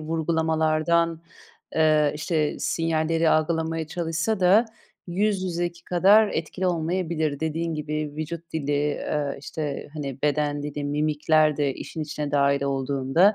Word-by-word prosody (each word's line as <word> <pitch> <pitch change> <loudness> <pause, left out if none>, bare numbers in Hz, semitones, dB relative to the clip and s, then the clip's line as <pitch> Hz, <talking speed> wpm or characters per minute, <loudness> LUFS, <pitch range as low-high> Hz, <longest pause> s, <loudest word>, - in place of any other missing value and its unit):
vurgulamalardan, 160 +1 +1 0.5
eee, 155 -2 +3
işte, 155 0 -1
sinyalleri 165 0 +1
algılamaya 160 0 0
çalışsa 170 +5 -2
da 195 +6 +5 0.4
yüz 195 +2 0
yüzeki 175 -1 -3
kadar 200 +4 +5
etkili 180 +3 -3
olmayabilir. 165 -3 -1
Dediğin 160 +1 -2
gibi, 150 -1 -3
vücut 165 +2 -6
dili, 145 -2 -2
eee, 145 0 -1
işte, 145 -1 -5
hani, 140 -3 -5
beden 145 0 0
dili, 145 0 -4
mimikler 150 +1 +2
de 140 -3 0
işin 160 - -6
içine 150 -1 -4
dâhil 140 -1 +2
olduğunda 140 +7 +2
155 Hz, 120 wpm, -25 LUFS, 150-170 Hz, 0.5 s, da